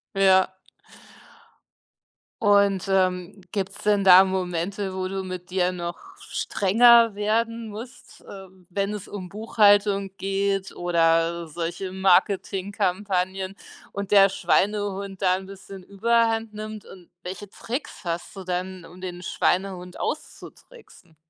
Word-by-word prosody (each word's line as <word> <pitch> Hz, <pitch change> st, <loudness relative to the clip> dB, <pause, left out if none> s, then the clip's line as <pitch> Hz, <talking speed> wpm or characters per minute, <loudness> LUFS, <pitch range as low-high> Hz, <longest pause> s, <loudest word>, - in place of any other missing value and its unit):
Ja. 190 Hz, -1 st, +4 dB, 1.9 s
Und, 200 Hz, -2 st, +3 dB
ähm, 185 Hz, 0 st, 0 dB
gibt's 195 Hz, -1 st, -4 dB
denn 205 Hz, -1 st, +3 dB
da 190 Hz, 0 st, +8 dB
Momente, 190 Hz, +1 st, -3 dB
wo 185 Hz, 0 st, -2 dB
du 190 Hz, +1 st, -3 dB
mit 185 Hz, -1 st, -7 dB
dir 180 Hz, -1 st, +1 dB
noch 180 Hz, -, -7 dB
strenger 230 Hz, -, +4 dB
werden 225 Hz, +2 st, -1 dB
musst, 225 Hz, +4 st, -11 dB
ähm, 190 Hz, -2 st, -12 dB
wenn 200 Hz, +2 st, -2 dB
es 205 Hz, -2 st, -7 dB
um 185 Hz, -3 st, -7 dB
Buchhaltung 205 Hz, -1 st, +3 dB
geht 195 Hz, 0 st, -1 dB
oder 170 Hz, -1 st, +1 dB
solche 170 Hz, +4 st, -5 dB
Marketingkampagnen 190 Hz, 0 st, 0 dB, 0.4 s
und 200 Hz, -1 st, -5 dB
der 195 Hz, -1 st, +7 dB
Schweinehund 200 Hz, 0 st, -1 dB
da 185 Hz, -1 st, +3 dB
'n 190 Hz, 0 st, -8 dB
bisschen 195 Hz, -1 st, -11 dB
Überhand 225 Hz, +2 st, +1 dB
nimmt? 215 Hz, 0 st, -7 dB
Und 180 Hz, -3 st, -15 dB
welche 190 Hz, +3 st, -7 dB
Tricks 245 Hz, +8 st, -6 dB
hast 170 Hz, -2 st, -4 dB
du 195 Hz, -, -8 dB
dann, 185 Hz, 0 st, -4 dB
um 180 Hz, +2 st, -14 dB
den 180 Hz, -1 st, -7 dB
Schweinehund 180 Hz, 0 st, -1 dB
auszutricksen? 440 Hz, -, -8 dB
195 Hz, 120 wpm, -24 LUFS, 185-205 Hz, 1.9 s, da